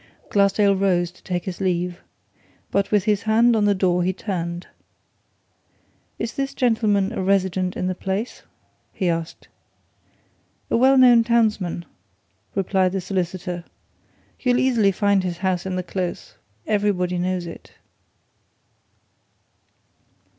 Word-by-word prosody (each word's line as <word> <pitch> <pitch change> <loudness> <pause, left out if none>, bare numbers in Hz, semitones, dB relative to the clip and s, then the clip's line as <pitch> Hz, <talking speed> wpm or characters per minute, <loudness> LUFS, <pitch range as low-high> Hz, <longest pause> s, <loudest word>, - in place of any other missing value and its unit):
Glassdale 200 0 +3
rose 180 -3 +1
to 185 - -22
take 175 -2 -3
his 185 0 -5
leave. 180 -1 -1 0.7
But 200 0 +1
with 205 -3 +2
his 210 -1 +1
hand 225 +2 +3
on 210 -2 +2
the 205 -1 +3
door 180 -2 +1
he 180 +1 +1
turned. 175 -3 -4 1.5
"Is 225 0 -4
this 275 0 -3
gentleman 215 -5 +2
a 225 - -3
resident 185 -1 0
in - - -2
the 185 - 0
place?" 195 +5 -4 0.5
he 190 - -2
asked. 165 -1 -4 1.2
"A - - +3
well 265 +3 +5
known 245 -3 +7
townsman," 215 -7 +1 0.7
replied 190 -1 +1
the 195 - 0
solicitor. 180 -1 -3 0.8
"You'll 245 -1 +2
easily 235 -7 +3
find 200 0 +2
his 175 -2 -3
house 185 0 -1
in 185 - -2
the 185 - -2
Close 180 0 -4 0.3
everybody 190 -4 0
knows 180 0 -1
it." 165 - -11
190 Hz, 125 wpm, -22 LUFS, 180-210 Hz, 1.5 s, known